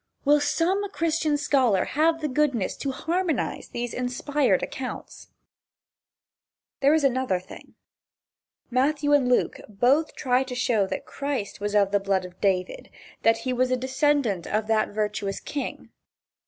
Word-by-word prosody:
Will 295 +1 +5
some 380 +7 0
Christian 315 -2 0
scholar 255 -10 +2
have 325 +3 +1
the 305 - 0
goodness 265 -7 0
to 280 - -3
harmonize 330 +2 -2
these 240 0 -4
"inspired" 250 -3 0
accounts? 255 -1 -6 1.5
There 280 +3 +4
is 315 - +1
another 260 -8 +1
thing. 185 - -14 1.0
Matthew 290 +3 +2
and 270 -4 +4
Luke 250 - +1
both 255 +9 +2
try 250 0 +1
to 260 -1 -7
show 235 -5 +1
that - - -5
Christ 275 -9 -4
was 205 0 -2
of 200 -1 +3
the 205 - +3
blood 195 -1 0
of 180 0 -13
David, 185 -2 -1 0.3
that 225 0 +4
he 255 - 0
was 250 +1 +1
a 255 - +1
descendant 260 - 0
of 215 +1 0
that 220 0 +1
virtuous 210 -1 -2
king. 285 - -6
255 Hz, 145 wpm, -25 LUFS, 210-290 Hz, 1.5 s, Will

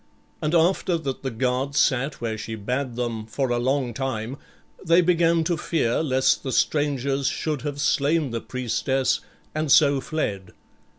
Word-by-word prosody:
And 155 +3 0
after 170 +1 +2
that 140 -5 -4
the 135 - -2
guards 130 +3 -1
sat 135 +2 +1
where 115 -2 -2
she 110 +1 -5
bade 125 +4 -3
them 115 -3 -3
for 130 +3 -2
a 120 - +1
long 130 0 0
time, 130 0 -3 0.5
they 170 -1 +4
began 170 -1 +3
to 170 +1 0
fear 155 -7 0
lest 130 -4 +2
the 135 - -4
strangers 140 0 +1
should 150 -4 -2
have 145 -1 -4
slain 145 0 +1
the 115 -1 -3
priestess 130 +1 0 0.3
and 155 -2 -1
so 140 -2 +5
fled. 100 - -3
135 Hz, 160 wpm, -24 LUFS, 120-155 Hz, 0.5 s, so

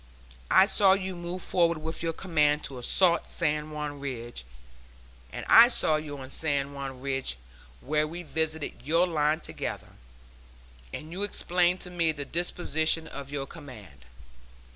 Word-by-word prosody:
I 190 - +6
saw 195 -1 +5
you 190 -1 -3
move 175 +1 -6
forward 170 -2 +1
with 160 +1 -6
your 165 -1 -1
command 155 -4 +1
to 130 -2 -6
assault 170 +7 +2
San 150 -2 -1
Juan 150 -1 -5
Ridge, 120 - -6 0.9
and - - -7
I 230 +1 +9
saw 155 -10 +3
you 150 -2 -7
on 130 0 -10
San 140 -3 0
Juan 135 -2 -7
Ridge, 135 - -3 0.4
where 150 +2 0
we 175 +3 -7
visited 160 -1 -2
your 165 +6 +3
line 155 -2 0
together, - - -5 1.0
and 155 +1 -8
you 185 +3 -5
explained 180 -3 +1
to 180 - -5
me 170 -2 +2
the 145 -2 -5
disposition 165 -1 +2
of 140 -3 -9
your 140 -1 -3
command. 110 - -13
155 Hz, 150 wpm, -27 LUFS, 140-175 Hz, 1.0 s, I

